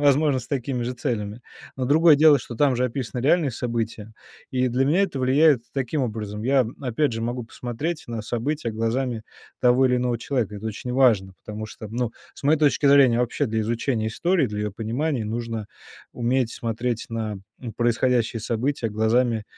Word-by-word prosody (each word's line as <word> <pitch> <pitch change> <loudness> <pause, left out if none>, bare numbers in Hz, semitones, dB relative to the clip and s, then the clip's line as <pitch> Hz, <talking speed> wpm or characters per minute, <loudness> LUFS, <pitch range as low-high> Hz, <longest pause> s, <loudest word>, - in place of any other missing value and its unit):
возможно, 145 -1 +3
с 125 - -12
такими 130 -2 -2
же 120 +2 -2
целями. 115 -4 -3 0.4
Но 130 - -2
другое 155 +3 +6
дело, 150 -1 +6
что 120 - -8
там 135 +1 +2
же 125 - +1
описаны 125 -1 -3
реальные 150 +1 +3
события, 115 -2 -4 0.4
и 130 0 +1
для 125 +2 +1
меня 160 +8 +3
это 180 -8 -2
влияет 130 0 +4
таким 135 +2 -1
образом. 105 -3 -4
Я, 130 0 +3
опять 135 +1 0
же, 115 - -3
могу 120 +1 -3
посмотреть 130 +8 -4
на 115 -1 -3
события 120 +4 -2
глазами 115 +1 -1 0.4
того 125 +1 +4
или 125 -1 +2
иного 125 -1 0
человека. 115 -5 -2
Это 110 - -6
очень 110 +3 -5
важно, 115 -8 +3
потому 105 0 -6
что, 110 0 -9
ну, 120 +2 -2 0.2
с - - -14
моей 150 +3 +3
точки 145 -1 +3
зрения, 135 -4 +6
вообще 120 -1 0
для 110 0 -1
изучения 115 +1 -1
истории, 170 +7 +1
для 105 -2 -5
её 105 -1 -2
понимания 120 +5 -2
нужно 115 0 -4 0.5
уметь 120 0 0
смотреть 115 0 -3
на, 110 -2 -3 0.2
м, 120 -3 -6
происходящие 120 0 +1
события 115 +3 -1
глазами 110 +1 +1
120 Hz, 180 wpm, -24 LUFS, 115-135 Hz, 0.5 s, другое